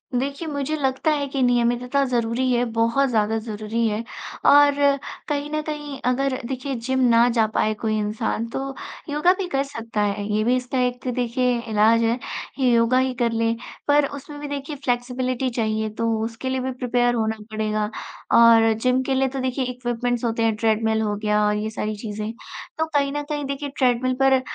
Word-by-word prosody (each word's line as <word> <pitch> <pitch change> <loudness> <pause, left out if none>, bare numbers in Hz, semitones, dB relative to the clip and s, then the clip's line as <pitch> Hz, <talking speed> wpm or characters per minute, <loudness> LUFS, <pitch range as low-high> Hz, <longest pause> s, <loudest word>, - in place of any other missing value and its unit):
देखिए, 280 +5 -2
मुझे 285 +1 -2
लगता 275 +2 0
है 285 -2 0
कि 275 0 -2
नियमितता 245 +2 +2
ज़रूरी 240 +2 +1
है, 245 0 +2
बहुत 235 +4 +2
ज़्यादा 220 -1 +1
ज़रूरी 220 +1 -2
है 215 +2 -2 0.5
और 285 0 +7 0.5
कहीं 290 0 -2
न 305 0 -1
कहीं, 295 -3 -6
अगर 260 +1 +1
देखिए, 265 +1 -3
जिम 260 +3 -1
ना 230 +1 +5
जा 220 - +5
पाए 215 - +2
कोई 215 -1 0
इंसान, 215 +2 -2
तो 270 +2 -4 0.3
योगा 300 +5 +3
भी 375 - -2
कर 275 -4 0
सकता 230 -6 -4
है। 205 0 -1
ये 215 0 +2
भी 245 +2 +3
इसका 255 +1 -2
एक 250 +1 -2
देखिए 245 0 0
इलाज 220 +2 +4
है, 230 +1 +2 0.4
योगा 240 -1 +3
ही 260 0 +1
कर 235 -1 0
ले। 230 0 +1 0.3
पर 290 0 +4
उसमें 285 +1 -8
भी 290 - -5
देखिए 285 +1 -5
फ़्लेक्सिबिलिटी 255 -1 -1
चाहिए, 220 -2 -1
तो 230 +2 -2 0.2
उसके 230 +3 -5
लिए 260 0 -1
भी 260 +1 -2
प्रिपेयर 245 -1 +1
होना 220 -1 0
पड़ेगा 215 -1 -1 0.5
और 230 -1 +7
जिम 255 0 +2
के 270 - -1
लिए 265 0 +2
तो 265 +1 -4
देखिए, 260 0 -1
इक्विपमेंट्स 245 -1 -2
होते 230 0 0
हैं, 225 -1 +2
ट्रेडमिल 220 0 +1
हो 210 -1 0
गया 210 0 +1
और 210 - +1
ये 215 +1 -2
सारी 215 -1 -3
चीज़ें। 210 0 -5 0.5
तो 320 - +1
कहीं 280 -1 +2
न 290 0 -2
कहीं 295 -1 -2
देखिए, 280 +1 -4
ट्रेडमिल 255 0 +2
पर 265 -1 +5
245 Hz, 190 wpm, -23 LUFS, 225-270 Hz, 0.5 s, और